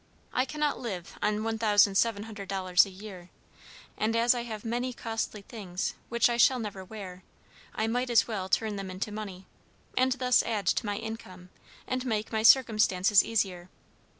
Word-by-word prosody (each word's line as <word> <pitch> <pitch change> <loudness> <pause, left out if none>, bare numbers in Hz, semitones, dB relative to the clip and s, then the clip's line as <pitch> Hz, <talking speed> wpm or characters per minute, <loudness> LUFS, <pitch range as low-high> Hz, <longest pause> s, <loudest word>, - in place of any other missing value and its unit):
I 255 - +2
cannot 300 +2 -1
live 190 -8 -6
on 210 0 0
$1,700 205 -3 +2
a - - -9
year, 190 -2 -11 0.7
and 220 +1 0
as 235 +2 +4
I 245 - -3
have 220 -3 -7
many 245 +2 -2
costly 225 -3 -4
things 195 -6 -4 0.2
which 235 -1 +3
I 240 -1 -1
shall 255 +2 +5
never 205 -5 -5
wear, 185 -2 -9 0.5
I 220 - 0
might 245 +3 -1
as 235 -2 +4
well 195 -5 -4
turn 215 +1 0
them 195 -1 -5
into 185 +3 -4
money, 200 -3 -7 0.5
and 255 0 +3
thus 250 -1 +3
add 215 -4 -2
to 210 - +1
my 205 0 -2
income, 190 -5 -8 0.4
and 255 0 -2
make 220 -4 -2
my 220 -1 0
circumstances 215 -5 +5
easier. 185 -5 -2
215 Hz, 160 wpm, -29 LUFS, 195-235 Hz, 0.7 s, shall